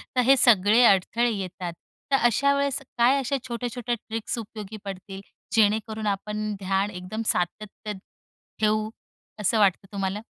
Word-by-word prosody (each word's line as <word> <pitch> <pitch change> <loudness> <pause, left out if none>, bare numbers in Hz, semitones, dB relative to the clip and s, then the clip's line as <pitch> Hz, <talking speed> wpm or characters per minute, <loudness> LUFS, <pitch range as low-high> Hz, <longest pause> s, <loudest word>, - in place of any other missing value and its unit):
तर 250 - +4
हे 270 +2 +7
सगळे 220 0 +5
अडथळे 225 +4 +3
येतात. 185 -3 -5 0.4
तर - - +5
अशा 280 +4 +3
वेळेस 280 0 0 0.2
काय 245 +4 +5
अशा 270 +1 -1
छोट्या-छोट्या 240 0 -3
ट्रिक्स 225 +1 -3
उपयोगी 215 -1 -7
पडतील, 195 0 -7 0.3
जेणेकरून 220 0 +1
आपण 210 +1 -2
ध्यान 195 +1 0
एकदम 190 +3 -6
सातत्य 210 +3 -2 0.7
ठेऊ, 215 0 +1 0.5
असं 215 +2 +2
वाटतं 195 -1 +2
तुम्हाला? 195 0 -2
215 Hz, 135 wpm, -25 LUFS, 195-235 Hz, 0.7 s, हे